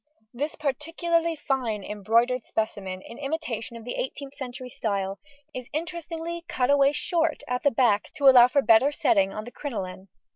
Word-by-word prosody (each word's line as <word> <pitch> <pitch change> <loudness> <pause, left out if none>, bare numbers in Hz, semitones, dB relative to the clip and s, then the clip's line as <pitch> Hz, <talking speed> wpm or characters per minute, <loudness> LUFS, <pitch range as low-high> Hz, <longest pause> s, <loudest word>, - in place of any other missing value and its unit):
This 290 +5 -3
particularly 330 +3 -1
fine 250 -8 -2
embroidered 230 +5 +1
specimen, 190 -4 -3
in 235 - -11
imitation 275 -6 -4
of 225 - -11
the 245 - -4
18th 275 +1 -5
century 260 -2 -7
style, 200 -5 -3 0.3
is 255 -3 -7
interestingly 335 +1 -4
cut 255 +1 +1
away 280 -1 +5
short 320 +1 0
at 250 0 -1
the 285 - +4
back 225 -5 +2
to 285 -3 +3
allow 250 -2 +9
for 275 +2 +2
better 225 +6 +5
setting 195 -8 +2
on 215 - -5
the 240 - -9
crinoline. 195 -10 -6
255 Hz, 160 wpm, -26 LUFS, 220-295 Hz, 0.3 s, allow